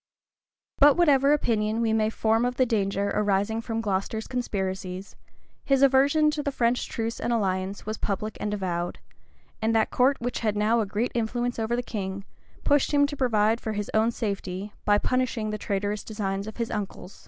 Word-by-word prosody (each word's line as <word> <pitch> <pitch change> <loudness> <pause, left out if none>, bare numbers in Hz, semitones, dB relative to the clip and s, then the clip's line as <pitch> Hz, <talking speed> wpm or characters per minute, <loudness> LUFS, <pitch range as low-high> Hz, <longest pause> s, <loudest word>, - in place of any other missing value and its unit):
But 290 +1 +7
whatever 285 -5 +4
opinion 220 -6 +1
we 225 -1 +1
may 215 -1 +2
form 225 +1 +1
of 250 0 0
the 255 - +3
danger 200 -3 0
arising 205 +2 +1
from 225 -1 -3
Glocester's 205 +2 -2
conspiracies, 190 -6 -4 0.5
his 275 -1 +3
aversion 280 +3 +4
to 300 -1 -2
the 285 - -2
French 245 -2 +1
truce 230 0 -3
and 240 - -1
alliance 195 -3 -1
was 215 +1 -4
public 210 +2 -2
and 210 - -2
avowed; 175 -4 -2 0.6
and 225 +1 +1
that 220 - +2
court 265 +2 +3
which 245 +1 -3
had 215 -2 0
now 220 +3 +3
a 215 - 0
great 210 +5 -1
influence 240 +1 -1
over 225 +1 0
the 245 - -2
king, 195 -3 -5 0.4
pushed 290 -1 +3
him 285 0 +5
to 290 0 -4
provide 225 -3 +2
for 220 - -3
his 210 -1 -4
own 220 +1 +3
safety, 200 -3 -4
by 205 0 +5
punishing 235 -2 -1
the 215 - -4
traitorous 205 +1 -2
designs 200 -2 -3
of 220 - -8
his 230 -1 -2
uncle. 200 -3 -5
220 Hz, 185 wpm, -26 LUFS, 205-245 Hz, 0.6 s, But